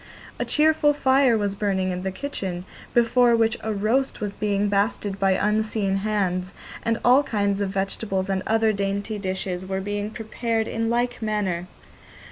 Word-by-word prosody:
A -, -, 0 dB
cheerful 305 Hz, -1 st, +3 dB
fire 265 Hz, -4 st, +3 dB
was 205 Hz, -2 st, -1 dB
burning 195 Hz, -2 st, 0 dB
in 180 Hz, 0 st, -3 dB
the 190 Hz, 0 st, -2 dB
kitchen, 185 Hz, -7 st, -4 dB, 0.3 s
before 240 Hz, 0 st, +4 dB
which 225 Hz, -1 st, +2 dB
a 220 Hz, -, -2 dB
roast 220 Hz, +7 st, 0 dB
was 205 Hz, -1 st, -3 dB
being 205 Hz, -1 st, 0 dB
basted 200 Hz, 0 st, 0 dB
by 195 Hz, 0 st, +3 dB
unseen 210 Hz, 0 st, 0 dB
hands, 195 Hz, -3 st, -1 dB, 0.3 s
and 230 Hz, 0 st, 0 dB
all 250 Hz, +3 st, +7 dB
kinds 205 Hz, -6 st, -1 dB
of 200 Hz, -, 0 dB
vegetables 195 Hz, 0 st, -2 dB
and 190 Hz, -1 st, 0 dB
other 220 Hz, 0 st, +3 dB
dainty 200 Hz, +2 st, -2 dB
dishes 185 Hz, -1 st, -3 dB
were 190 Hz, 0 st, -3 dB
being 205 Hz, +1 st, -3 dB
prepared 225 Hz, 0 st, -2 dB
in 225 Hz, 0 st, -1 dB
like 240 Hz, +1 st, 0 dB
manner. 200 Hz, -5 st, -1 dB
205 Hz, 160 wpm, -24 LUFS, 195-225 Hz, 0.3 s, all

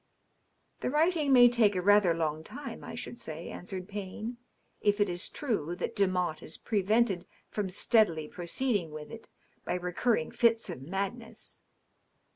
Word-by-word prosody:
'* -, -, -44 dB
" -, -, -44 dB
The -, -, 0 dB
writing 305 Hz, 0 st, +2 dB
may 245 Hz, -2 st, +9 dB
take 230 Hz, -4 st, +4 dB
a 180 Hz, -, +1 dB
rather 205 Hz, -3 st, +5 dB
long 155 Hz, -1 st, -1 dB
time, 285 Hz, -, -8 dB
I -, -, -7 dB
should 240 Hz, -, -6 dB
say," 160 Hz, -2 st, -6 dB
answered 185 Hz, 0 st, -6 dB
Payne, 210 Hz, +4 st, -5 dB, 0.2 s
" -, -, -42 dB
if 205 Hz, 0 st, +2 dB
it 205 Hz, -, +4 dB
is 175 Hz, 0 st, -1 dB
true 200 Hz, -, -2 dB
that -, -, -4 dB
Demotte 180 Hz, -5 st, +1 dB
is 160 Hz, -, -7 dB
prevented 210 Hz, -2 st, +1 dB, 0.2 s
from 205 Hz, -3 st, -2 dB
steadily 180 Hz, -5 st, +3 dB
proceed 205 Hz, +9 st, 0 dB
ing 170 Hz, -5 st, -6 dB
with 150 Hz, 0 st, -8 dB
it 230 Hz, 0 st, -10 dB, 0.4 s
by -, -, -1 dB
recurrent 180 Hz, +1 st, 0 dB
fits 230 Hz, -4 st, +3 dB
of 150 Hz, -, -7 dB
madness.' 200 Hz, -, -4 dB
200 Hz, 170 wpm, -30 LUFS, 175-230 Hz, 0.4 s, may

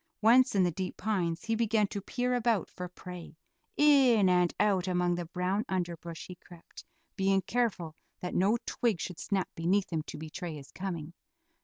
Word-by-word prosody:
Once 240 Hz, +1 st, +6 dB
in 190 Hz, -, +4 dB
the 175 Hz, -, +2 dB
deep 185 Hz, +3 st, -4 dB
pines 180 Hz, -5 st, -1 dB
he 225 Hz, -, 0 dB
began 225 Hz, -1 st, +2 dB
to 200 Hz, 0 st, -5 dB
peer 250 Hz, +5 st, -1 dB
about 235 Hz, -5 st, +1 dB
for 180 Hz, -, -6 dB
prey; 180 Hz, -2 st, -10 dB, 0.4 s
in 265 Hz, -9 st, +5 dB
and 180 Hz, -1 st, +3 dB
out 195 Hz, -3 st, +2 dB
among 180 Hz, -1 st, +1 dB
the 175 Hz, -1 st, -3 dB
brown 185 Hz, +4 st, -1 dB
underbrush 170 Hz, -3 st, -4 dB
he 180 Hz, -, -8 dB
crept, 175 Hz, -1 st, -14 dB, 0.3 s
being 195 Hz, -1 st, +2 dB
careful 190 Hz, -8 st, -1 dB, 0.2 s
that 180 Hz, -, -5 dB
no 200 Hz, +6 st, +3 dB
twig 225 Hz, -8 st, 0 dB
should 180 Hz, -1 st, -5 dB
snap 195 Hz, -3 st, -1 dB
beneath 185 Hz, +3 st, 0 dB
him 160 Hz, -, 0 dB
to 150 Hz, -, -8 dB
betray 160 Hz, +2 st, -6 dB
his 140 Hz, -2 st, -11 dB
coming. 170 Hz, -4 st, -5 dB
185 Hz, 175 wpm, -30 LUFS, 175-215 Hz, 0.4 s, Once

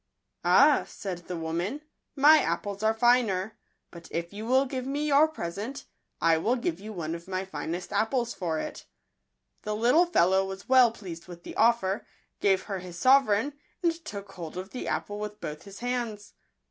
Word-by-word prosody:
" -, -, -50 dB
Ah," -, -, +6 dB
said 185 Hz, -4 st, -6 dB
the 180 Hz, -, -4 dB
woman, 170 Hz, -, -3 dB, 0.2 s
" -, -, -55 dB
my 300 Hz, +2 st, +7 dB
apples 200 Hz, -6 st, -2 dB
are 220 Hz, 0 st, +3 dB
finer; 225 Hz, -4 st, +2 dB, 0.4 s
but 170 Hz, -, -11 dB
if 170 Hz, +2 st, -4 dB
you 215 Hz, +2 st, -6 dB
will 260 Hz, +2 st, +4 dB
give 255 Hz, -1 st, -4 dB
me 290 Hz, +2 st, -1 dB
your 295 Hz, +1 st, +5 dB
present,. 235 Hz, -, -6 dB, 0.3 s
I 165 Hz, 0 st, +3 dB
will 235 Hz, +9 st, +1 dB
give 175 Hz, -9 st, -2 dB
you 215 Hz, +2 st, -8 dB
one 165 Hz, -5 st, -4 dB
of 170 Hz, +1 st, -8 dB
my 190 Hz, 0 st, -2 dB
finest 170 Hz, 0 st, -5 dB
apples 235 Hz, +3 st, 0 dB
for 165 Hz, -4 st, -2 dB
it." -, -, -6 dB, 0.7 s
The 210 Hz, 0 st, -3 dB
little 250 Hz, +11 st, +4 dB
fellow 190 Hz, -, +3 dB
was 190 Hz, 0 st, -7 dB
well 255 Hz, -3 st, +6 dB
pleased 180 Hz, -7 st, -9 dB
with 175 Hz, -1 st, -11 dB
the -, -, -8 dB
offer, 220 Hz, -4 st, +2 dB, 0.4 s
gave 195 Hz, -2 st, +2 dB
her 195 Hz, -3 st, -4 dB
his 180 Hz, -1 st, -9 dB
sovereign, 260 Hz, +2 st, +4 dB, 0.3 s
and 340 Hz, -1 st, +3 dB
took 200 Hz, -9 st, -7 dB
hold 170 Hz, -2 st, -8 dB
of 185 Hz, +2 st, -6 dB
the 255 Hz, -, -5 dB
apple 205 Hz, 0 st, -3 dB
with 210 Hz, 0 st, -6 dB
both 150 Hz, 0 st, -7 dB
his 200 Hz, +1 st, -11 dB
hands. 240 Hz, -4 st, -3 dB
205 Hz, 185 wpm, -28 LUFS, 180-245 Hz, 0.7 s, my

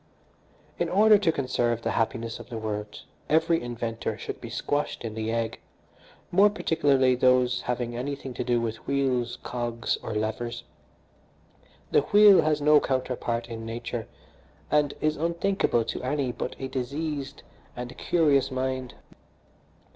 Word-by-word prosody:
"In -, -, 0 dB
order 210 Hz, +2 st, +6 dB
to 180 Hz, -5 st, +2 dB
conserve 120 Hz, -5 st, -1 dB
the -, -, 0 dB
happiness 115 Hz, 0 st, -1 dB
of -, -, -11 dB
the 115 Hz, -, -5 dB
world 105 Hz, -1 st, -5 dB, 0.3 s
every 165 Hz, +2 st, +3 dB
inventor 120 Hz, -1 st, -4 dB
should -, -, -6 dB
be -, -, -7 dB
squashed 145 Hz, -3 st, -2 dB
in 110 Hz, -, -4 dB
the 110 Hz, 0 st, -3 dB
egg, 115 Hz, -1 st, -2 dB, 0.7 s
more 200 Hz, +4 st, +6 dB
particularly 145 Hz, -10 st, +2 dB
those 125 Hz, 0 st, +3 dB
having 120 Hz, -1 st, -3 dB
anything 135 Hz, +1 st, -4 dB
to 125 Hz, -, -3 dB
do 120 Hz, -1 st, +1 dB
with 115 Hz, -1 st, -4 dB
wheels, 130 Hz, -3 st, 0 dB
cogs 120 Hz, -2 st, -2 dB
or 110 Hz, -, -5 dB
levers. 110 Hz, +2 st, -3 dB, 1.3 s
The -, -, +5 dB
wheel 205 Hz, -1 st, +7 dB
has 155 Hz, -1 st, +1 dB
no 150 Hz, 0 st, +6 dB
counterpart 125 Hz, -3 st, -2 dB
in 115 Hz, -1 st, -7 dB
nature, 115 Hz, 0 st, -5 dB, 0.6 s
and 145 Hz, -1 st, +2 dB
is 155 Hz, 0 st, +1 dB
unthinkable 170 Hz, -, +1 dB
to 115 Hz, -, -4 dB
any 130 Hz, 0 st, -1 dB
but 125 Hz, -, -5 dB
a 135 Hz, -, -4 dB
diseased 140 Hz, +2 st, -4 dB, 0.3 s
and 125 Hz, 0 st, -6 dB
curious 150 Hz, -6 st, +2 dB
mind. 130 Hz, -1 st, -3 dB
125 Hz, 140 wpm, -27 LUFS, 115-150 Hz, 1.3 s, wheel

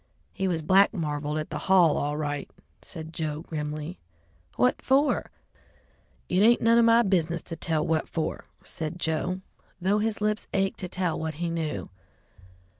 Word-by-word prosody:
"He 190 Hz, 0 st, -1 dB
was 165 Hz, -3 st, -1 dB
black 195 Hz, +6 st, +5 dB
marveled 150 Hz, -3 st, -2 dB
at 155 Hz, -, -4 dB
the -, -, -3 dB
hall 175 Hz, -5 st, +6 dB
all 145 Hz, +1 st, -1 dB
right," 145 Hz, -2 st, -3 dB, 0.3 s
said 160 Hz, -1 st, -8 dB
Joe 155 Hz, -2 st, -3 dB
grimly. 155 Hz, +1 st, -5 dB, 0.6 s
"What 250 Hz, -, +2 dB
for?" 280 Hz, +2 st, +2 dB, 1.0 s
"It 180 Hz, -, +1 dB
ain't 235 Hz, +3 st, +6 dB
none 230 Hz, +1 st, +4 dB
of 235 Hz, -, +5 dB
my 230 Hz, +1 st, +6 dB
business 170 Hz, -4 st, 0 dB
to 165 Hz, -, -7 dB
tell 160 Hz, -1 st, 0 dB
what 160 Hz, -1 st, 0 dB
for," 160 Hz, -, -3 dB, 0.2 s
said 160 Hz, +2 st, -5 dB
Joe, 180 Hz, +3 st, -1 dB, 0.4 s
though 195 Hz, +3 st, +2 dB
his 220 Hz, 0 st, -1 dB
lips 210 Hz, 0 st, -1 dB
ached 195 Hz, 0 st, 0 dB
to 185 Hz, -, -4 dB
tell 180 Hz, -3 st, -1 dB
what 160 Hz, -1 st, -3 dB
he 170 Hz, +2 st, -2 dB
knew. 160 Hz, -, -3 dB
170 Hz, 165 wpm, -27 LUFS, 155-195 Hz, 1.0 s, hall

